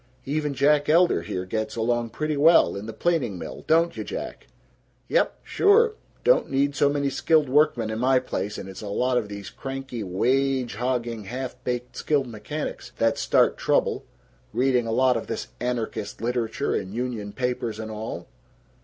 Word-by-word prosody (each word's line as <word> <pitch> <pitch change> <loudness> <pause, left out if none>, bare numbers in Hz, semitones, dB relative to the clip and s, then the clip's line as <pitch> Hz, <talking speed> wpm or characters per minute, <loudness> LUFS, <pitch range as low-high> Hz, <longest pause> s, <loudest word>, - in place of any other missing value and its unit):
Even 150 0 -1
Jack 145 +2 +3
Elder 170 - +4
here 90 +2 -4
gets 110 +3 -3
along 120 0 0
pretty 155 +6 -2
well, 160 +4 +5
in 100 +2 -6
the - - -4
planing 135 - 0
mill, - - -7
don't 165 +2 +3
you, - - -4
Jack?" - - -6 0.6
"Yep. - - +2
Sure. 430 +2 +4 0.3
Don't - - +4
need 140 +1 +1
so 140 +2 +3
many 140 -1 0
skilled 155 +2 +3
workmen 130 -5 +2
in 110 - -3
my 130 +2 +4
place, 105 -5 -3
and - - -7
it's 95 0 -9
a 105 - -6
lot 125 +5 +1
of 105 -3 -6
these 100 -1 -7
cranky, 135 -3 -6
wage 130 +6 +1
hogging, 120 -1 -2
half 125 +4 -5
baked 125 0 -3
skilled 145 -3 +1
mechanics 120 +6 -6
that - - +2
start - - +3
trouble - - +1 0.5
reading 125 -2 +2
a - - -1
lot 130 +2 +3
of 115 - -5
this 115 - -4
anarchist 120 -4 -3
literature 120 +2 -1
and 95 +1 -3
union 115 -4 -3
papers 120 -2 -2
and 110 0 -5
all." 110 +1 -6
125 Hz, 170 wpm, -25 LUFS, 110-140 Hz, 0.6 s, well